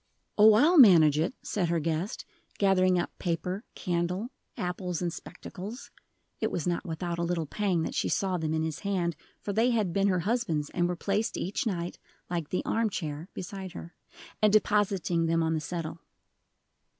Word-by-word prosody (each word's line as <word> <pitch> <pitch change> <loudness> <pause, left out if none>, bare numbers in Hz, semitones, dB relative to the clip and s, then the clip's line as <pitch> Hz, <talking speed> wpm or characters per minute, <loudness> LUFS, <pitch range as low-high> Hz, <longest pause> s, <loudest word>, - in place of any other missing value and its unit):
"Oh, 215 +1 +8
I'll 305 +10 +5
manage 160 - +8
it," 170 +11 0
said 180 -5 -1
her 170 -1 +1
guest, 165 - -2 0.3
gathering 185 -2 +3
up 175 - -1
paper, 180 +4 -2
candle, 180 +5 -1 0.3
apples, 180 -1 -3
and 175 -2 -2
spectacles 210 +8 -9 0.5
(it - - 0
was 170 - -3
not 175 0 -1
without 170 +1 -3
a - - 0
little 170 -1 -1
pang 185 0 0
that - - -3
she - - 0
saw 185 -2 0
them 155 -1 -2
in 160 0 0
his 160 -2 -3
hand, 180 -5 -1 0.3
for 205 - -2
they 225 +4 +3
had 215 -8 +1
been 195 +1 +2
her 185 -3 +2
husband's, 195 -9 -1
and 175 0 +1
were 180 - -2
placed 200 +5 -1
each 210 +7 -2
night, 175 -4 -3 0.3
like 170 -4 -2
the 185 - -2
arm 225 -1 +1
chair, 160 -2 -5
beside 190 0 -6
her) 170 -1 -9 0.5
and 215 -1 +5
depositing 195 -5 +2
them 165 0 +2
on 160 0 +1
the 160 - -1
settle. 165 0 -5
180 Hz, 180 wpm, -29 LUFS, 165-200 Hz, 0.5 s, Oh